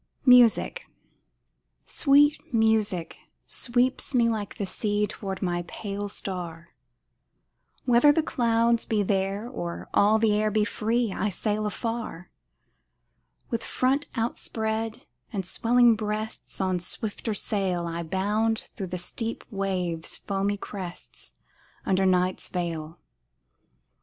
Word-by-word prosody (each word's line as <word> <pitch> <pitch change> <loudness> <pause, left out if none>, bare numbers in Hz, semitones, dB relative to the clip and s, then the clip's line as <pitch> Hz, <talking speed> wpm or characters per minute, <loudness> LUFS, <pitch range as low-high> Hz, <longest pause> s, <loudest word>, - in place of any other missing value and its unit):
MUSIC 250 -3 +5 1.0
Sweet 290 +1 +4
music 220 -6 +1 0.3
sweeps 255 +2 0
me 235 -1 +4
like 215 -3 -3
the 205 - -2
sea 205 +2 0
Toward 195 -2 -5
my 175 -1 -1
pale 205 +1 -5
star, 170 -4 -4 1.2
Whether 245 +4 +6
the 315 +2 +2
clouds 235 -4 +2
be 215 -2 +1
there 195 +2 -1
or 175 -9 -5
all 210 +2 +5
the 220 -1 +3
air 215 +1 +2
be 210 0 +2
free 225 +1 0
I 210 - 0
sail 210 +2 -1
afar. 225 -4 -4 1.2
With 230 -1 -1
front 270 +3 +1
outspread 225 -1 -2 0.3
and 195 -5 -3
swelling 235 +4 +4
breasts, 215 0 -4
On 185 -2 +1
swifter 210 +4 -3
sail 190 -5 -1
I 170 0 -3
bound 210 +6 0
through 195 - -4
the 180 +1 -4
steep 225 +6 -4
waves' 185 -5 -2
foamy 200 +1 -1
crests 185 -3 -8 0.5
Under 190 0 +2
night's 185 0 +1
veil. 165 -2 -4
210 Hz, 115 wpm, -26 LUFS, 190-230 Hz, 1.2 s, Whether